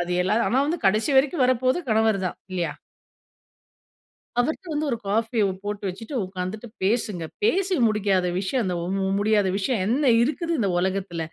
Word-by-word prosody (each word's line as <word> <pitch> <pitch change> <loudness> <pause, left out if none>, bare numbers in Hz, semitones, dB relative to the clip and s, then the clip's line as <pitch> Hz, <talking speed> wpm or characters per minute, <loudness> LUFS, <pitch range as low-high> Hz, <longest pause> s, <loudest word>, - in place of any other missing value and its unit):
அது 175 0 -3
எல்லாம் 210 +5 +1
ஆனா 255 - +2
வந்து 335 +4 -1
கடைசி 215 +9 +2
வரைக்கும் 275 +2 +3
வரப்போறது 255 +3 +2
கணவர் 220 -1 +3
தான் - - -4 0.2
இல்லயா! 175 -3 -1 1.7
அவர்ட்ட 315 +8 -2
வந்து 300 +1 -1
ஒரு 235 - 0
காஃபிய 225 +2 +1 0.2
போட்டு 205 0 -4
வச்சுட்டு 220 +9 -7
உட்கார்ந்துட்டு 190 +5 -5
பேசுங்க. 200 -4 0 0.2
பேசி 390 -3 +2
முடிக்காத 200 -4 +1
விஷயம், 215 +6 -1
அந்த 180 -2 -1
மு 170 - -4
மு 195 -1 0
முடியாத 205 -1 +2
விஷயம் 205 0 0
என்ன 260 +3 +2
இருக்குது? 330 +6 -1
இந்த 205 -5 +1
உலகத்தில. 185 -2 -2
215 Hz, 160 wpm, -24 LUFS, 190-255 Hz, 1.7 s, வரைக்கும்